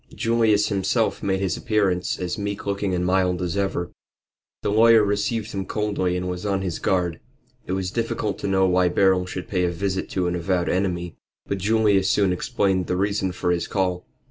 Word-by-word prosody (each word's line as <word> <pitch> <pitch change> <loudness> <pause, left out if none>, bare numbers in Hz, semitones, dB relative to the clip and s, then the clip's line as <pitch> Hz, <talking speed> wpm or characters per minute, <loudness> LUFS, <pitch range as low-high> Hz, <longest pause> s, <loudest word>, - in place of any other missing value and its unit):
Julius 115 -2 +2
himself 95 -2 0
made 95 -1 0
his 95 -2 0
appearance, 100 -5 0
as 90 -1 -3
meek 100 -1 -4
looking 100 -1 -1
and 90 0 -1
mild 90 -1 +1
as 90 -1 -2
ever. 95 -3 -1 0.7
The - - 0
lawyer 115 +1 +6
received 105 +2 -1
him 95 -1 -3
coldly 100 -4 -1
and 90 0 -3
was 90 0 -4
on 100 -2 -1
his 90 -4 -3
guard. 90 -3 0 0.5
It 90 - -2
was 95 -1 -2
difficult 115 -2 -2
to - - -3
know 95 -1 +3
why 90 -1 +3
Beryl 95 0 +2
should 90 0 -6
pay 90 -3 0
a 90 - +2
visit 95 +2 -2
to 95 -2 -1
an 90 - 0
avowed 90 0 0
enemy. 90 -2 -1 0.3
But 100 - -3
Julius 100 -1 +2
soon 100 -3 +2
explained 95 -3 0
the 90 - -1
reason 100 -1 0
for 90 0 -1
his 85 -1 -1
call. 90 -2 -1
95 Hz, 195 wpm, -23 LUFS, 90-100 Hz, 0.7 s, lawyer